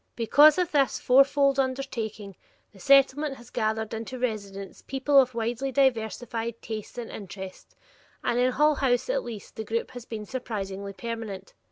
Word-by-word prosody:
Because 290 +6 +6
of 360 -1 0
this 280 -3 +2
fourfold 275 +1 +4
undertaking, 230 -7 -3 0.4
the 195 - -18
Settlement 275 +5 +4
has 240 -3 -15
gathered 220 0 -1
into 225 +3 -5
residence 200 -5 -4
people 270 +1 +3
of 255 -2 +2
widely 235 +4 -2
diversified 235 -3 0
tastes 220 +1 -7
and 240 -2 -6
interests, 190 -1 -9 0.5
and 240 - +1
in 250 +1 +2
Hull 300 +2 +4
House, 265 - +1
at - - -1
least, 215 -4 -9
the 220 - -3
group 225 +2 -3
has 245 -2 -9
been 215 -3 -6
surprisingly 200 -5 -5
permanent. 220 -3 -6
235 Hz, 155 wpm, -27 LUFS, 215-270 Hz, 0.5 s, Because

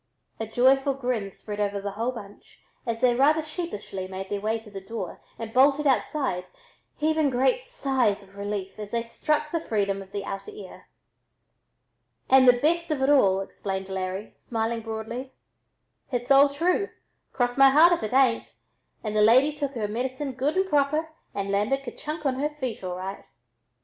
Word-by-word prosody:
A 225 - -3
joyful 270 +4 +3
grin 245 -6 -2
spread 205 +2 -8
over 205 -1 0
the 200 0 -4
whole 230 +5 -2
bunch 205 -5 -12 0.3
as 230 0 -2
they 250 -1 +5
rather 300 +5 +3
sheepishly 300 - -5
made 190 0 -6
their 205 -1 -2
way 220 +2 0
to 215 -2 -14
the 195 -1 -7
door 195 -2 -6 0.2
and 225 -1 -7
bolted 280 +3 +4
outside, 265 -8 0 0.5
heaving 310 -1 +2
great 265 - +2
sighs 265 - 0
of 195 0 -19
relief 200 -1 -5
as 210 -1 -6
they 230 +1 -1
struck 300 +6 -1
the 335 - 0
freedom 200 -8 -1
of 190 0 -12
the 200 -1 -4
outer 195 - -5
air. 425 - -11 1.4
"And 260 -1 +7
the 245 -1 +7
best 335 +3 +1
of 290 -4 0
it 275 - +4
all," 195 -9 +4
explained 195 0 -5
Larry, 190 +2 -4
smiling 230 0 -2
broadly; 225 +4 -6 0.8
"h'it's 245 +1 -2
all 275 +1 +7
true, 350 +8 0 0.4
cross 245 -1 0
my 275 0 +7
heart 320 +6 +7
if 345 - -1
it 215 - -2
tain't, 255 -2 +2 0.5
and 215 -1 -3
the 210 - +4
lady 255 +7 +5
took 285 -2 -3
her 220 -5 -2
medicine 260 +6 -3
good 275 +7 -1
and 380 0 +2
proper 305 0 +1 0.3
and 200 0 -2
landed 215 +8 +1
kerchunk 305 +3 -6
on 260 -1 0
her 295 +2 +1
feet 260 -9 -5
all 180 -1 -3
right." 190 +2 -6
245 Hz, 180 wpm, -26 LUFS, 205-280 Hz, 1.4 s, And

